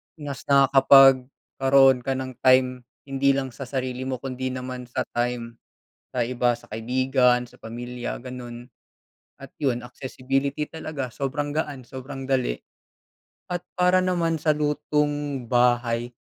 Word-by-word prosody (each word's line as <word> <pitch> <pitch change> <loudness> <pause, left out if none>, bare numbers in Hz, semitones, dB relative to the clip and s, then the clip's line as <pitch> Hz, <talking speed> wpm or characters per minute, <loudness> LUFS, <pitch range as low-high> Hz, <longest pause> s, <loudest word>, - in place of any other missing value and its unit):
mas 145 -4 -7
nakakapagkaroon 135 -1 +5
ka 135 +2 -2
ng 130 0 -4
time 130 0 +5 0.3
hindi 135 0 +1
lang 135 -1 -2
sa 130 +2 -8
sarili 130 0 -3
mo 130 - -1
kundi 130 0 -5
naman 125 -1 -5
sa 120 - -2
time 120 -1 -3 0.6
sa 125 - +2
iba, 120 0 +1
sa 115 - -19
kaibigan, 125 +2 +2
sa - - -20
pamilya, 120 +2 -6
ganun, 125 -1 -9 0.7
at 135 - -10
yun, 125 -4 0
accessibility 135 +3 -3
talaga, 150 -5 -5
sobrang 140 +3 -3
gaan, 145 -3 -3
sobrang 135 +2 -8
dali. 130 - +1 1.0
At 175 -1 -3
para 180 +1 +4
naman 175 -3 +1
sa 155 0 +2
lutong 145 -2 -1
bahay, 120 -1 +2
130 Hz, 130 wpm, -24 LUFS, 125-140 Hz, 1.0 s, nakakapagkaroon